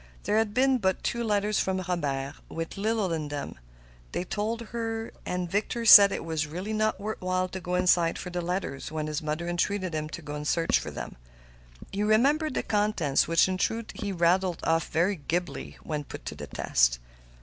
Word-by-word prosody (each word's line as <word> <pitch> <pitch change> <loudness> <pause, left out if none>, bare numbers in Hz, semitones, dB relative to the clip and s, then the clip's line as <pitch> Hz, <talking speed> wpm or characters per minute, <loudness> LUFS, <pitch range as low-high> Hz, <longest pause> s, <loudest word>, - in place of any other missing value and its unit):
There 215 - +2
had 220 -2 0
been 260 0 +3
but 190 -3 0
two 235 0 -1
letters 210 -1 +1
from 190 0 0
Robert, 140 -6 -2 0.2
with 165 0 -5
little 210 -3 0
in 155 -2 -2
them, 145 - -6 0.5
they - - -1
told 215 +5 -2
her. 225 -1 -3 0.2
Victor 200 +6 -1
said 200 -2 +10
it - - -4
was 160 -1 -1
really 180 +8 -5
not 215 -1 +1
worth 215 +2 -4
while 185 0 0
to 190 - -5
go 180 0 -3
inside 180 -2 +3
for 180 - -6
the 175 0 -2
letters, 175 -6 -3
when 155 -1 -2
his 155 +2 -3
mother 155 +2 -3
entreated 185 +1 -1
him 155 0 -2
to 170 - -7
go 145 0 -6
in 150 0 -5
search 165 +2 +2
of - - -7
them. - - -6 0.7
He 200 - -2
remembered 265 +8 +3
the - - 0
contents, 205 -10 +1
which 165 +2 +4
in 185 0 -2
truth 225 +2 -1
he 205 -5 -4
rattled 180 0 +2
off 165 -1 +1
very 180 +5 +1
glibly 145 - -3
when 150 -2 -3
put - - -9
to - - -4
the - - -8
test. - - +2
180 Hz, 195 wpm, -28 LUFS, 160-210 Hz, 0.7 s, said